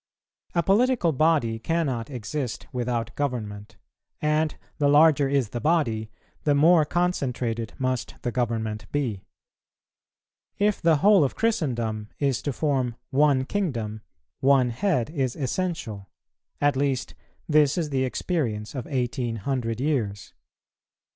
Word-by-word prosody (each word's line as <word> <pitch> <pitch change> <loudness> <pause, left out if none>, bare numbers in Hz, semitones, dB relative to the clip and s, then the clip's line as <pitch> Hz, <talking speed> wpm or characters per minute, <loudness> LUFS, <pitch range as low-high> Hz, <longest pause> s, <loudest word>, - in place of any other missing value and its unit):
A 170 - +3
political 220 -2 +3
body 145 -6 +2
cannot 135 -5 -1
exist 125 +1 -4
without 120 -2 -2
government, 110 -6 -4 0.4
and 155 0 +1 0.2
the 145 - +3
larger 145 -1 +5
is 135 -6 +1
the 120 +2 -5
body 120 -10 +1 0.3
the 145 -1 +3
more 160 +2 +5
concentrated 125 -10 -1
must 130 -2 -2
the 120 - -1
government 110 -3 -2
be. 125 -10 -1 1.4
If 205 0 +1
the 165 -2 +4
whole 205 -5 +7
of 135 - -1
Christendom 120 - -1
is 140 -4 0
to 145 - -2
form 130 -4 0 0.2
one 140 -1 +3
Kingdom, 115 - -2 0.4
one 130 -2 +4
head 150 - 0
is 135 -6 -1
essential; 130 - -3 0.5
at 145 -1 +2
least 135 -2 -1 0.3
this 150 -1 +4
is 160 -4 -1
the 130 -1 +1
experience 125 - -2
of 130 -4 -5
eighteen 125 -3 -1
hundred 115 0 -2
years. 120 -9 -2
135 Hz, 125 wpm, -25 LUFS, 115-155 Hz, 1.4 s, whole